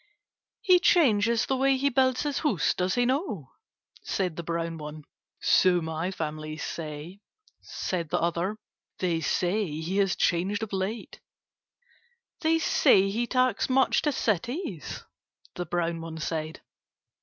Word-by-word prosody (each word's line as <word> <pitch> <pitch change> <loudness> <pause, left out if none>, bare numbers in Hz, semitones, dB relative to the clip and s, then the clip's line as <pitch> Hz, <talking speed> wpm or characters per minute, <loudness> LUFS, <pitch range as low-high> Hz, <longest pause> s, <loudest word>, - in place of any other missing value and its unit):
"He 365 -2 +6
changes 235 - +3
the 265 - 0
way 270 +1 +3
he 280 +2 +2
builds 260 0 +2
his 290 -2 -1
house, 230 - +1
does 185 +1 -1
he 245 0 +2
not?" 245 - -2 0.5
said 180 -4 -2
the 170 - -4
brown 165 0 -3
one. 150 0 -8 0.4
"So 180 -1 +4
my 160 +2 -3
family 155 -3 -5
say," 160 +4 -6 0.4
said 170 -4 -4
the - - +1
other. 170 +5 -1 0.4
"They 170 -3 0
say 190 +5 0
he 175 +5 -3
has 195 -2 +2
changed 190 +5 0
of 215 - -6
late." 195 +4 -3 1.2
"They 325 -1 +2
say 200 -11 +4
he 235 +3 -1
takes 255 -3 +1
much 260 0 +3
to 295 - +1
cities?" 230 - -2 0.5
the 175 -1 -5
brown 170 -1 -1
one 165 0 -7
said. 155 0 -4
190 Hz, 140 wpm, -27 LUFS, 165-245 Hz, 1.2 s, He